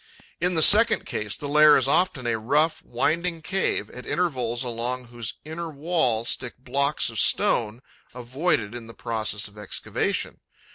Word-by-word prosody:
In 180 Hz, +1 st, +1 dB
the 160 Hz, -, +4 dB
second 225 Hz, +6 st, +6 dB
case, 105 Hz, -3 st, -3 dB
the 145 Hz, -, -6 dB
lair 150 Hz, +1 st, +6 dB
is -, -, +1 dB
often 175 Hz, -8 st, +1 dB
a 115 Hz, -2 st, -1 dB
rough, 150 Hz, +7 st, +1 dB
winding 170 Hz, +1 st, -1 dB
cave, 195 Hz, +2 st, -1 dB
at 125 Hz, -, -9 dB
intervals 125 Hz, -9 st, -1 dB
along 125 Hz, +1 st, -4 dB
whose 120 Hz, -2 st, -6 dB
inner 165 Hz, +2 st, -6 dB
wall 145 Hz, -7 st, 0 dB
stick 120 Hz, 0 st, -1 dB
blocks 140 Hz, +1 st, 0 dB
of 110 Hz, -, -5 dB
stone 115 Hz, +3 st, +1 dB, 0.3 s
avoided 125 Hz, -2 st, -1 dB
in 120 Hz, -2 st, -8 dB
the 115 Hz, -, -12 dB
process 110 Hz, -3 st, -2 dB
of 105 Hz, 0 st, -14 dB
excavation. 105 Hz, -, -3 dB
125 Hz, 155 wpm, -24 LUFS, 115-160 Hz, 0.3 s, second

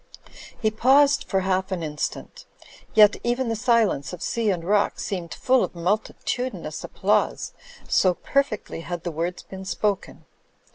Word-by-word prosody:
He 215 Hz, -2 st, +1 dB
paused 275 Hz, +6 st, +4 dB
for 190 Hz, -1 st, 0 dB
half 190 Hz, 0 st, 0 dB
an 180 Hz, -3 st, -2 dB
instant; 150 Hz, -1 st, -5 dB, 0.5 s
yet 210 Hz, -1 st, +7 dB
even 240 Hz, +1 st, 0 dB
the 225 Hz, -, 0 dB
silence 220 Hz, -, +1 dB
of 180 Hz, -, -6 dB
sea 230 Hz, -2 st, 0 dB
and 180 Hz, -4 st, -1 dB
rock 200 Hz, +3 st, +1 dB
seemed 175 Hz, -4 st, -4 dB
full 260 Hz, -1 st, +2 dB
of -, -, -4 dB
multitudinous 215 Hz, +7 st, -2 dB
applause, -, -, 0 dB, 0.3 s
so 185 Hz, -2 st, +3 dB
perfectly 275 Hz, -11 st, -1 dB
had 175 Hz, 0 st, -5 dB
the 175 Hz, -, -3 dB
words 170 Hz, +3 st, -3 dB
been 190 Hz, 0 st, -9 dB
spoken. 200 Hz, +1 st, -2 dB
200 Hz, 145 wpm, -24 LUFS, 180-230 Hz, 0.5 s, yet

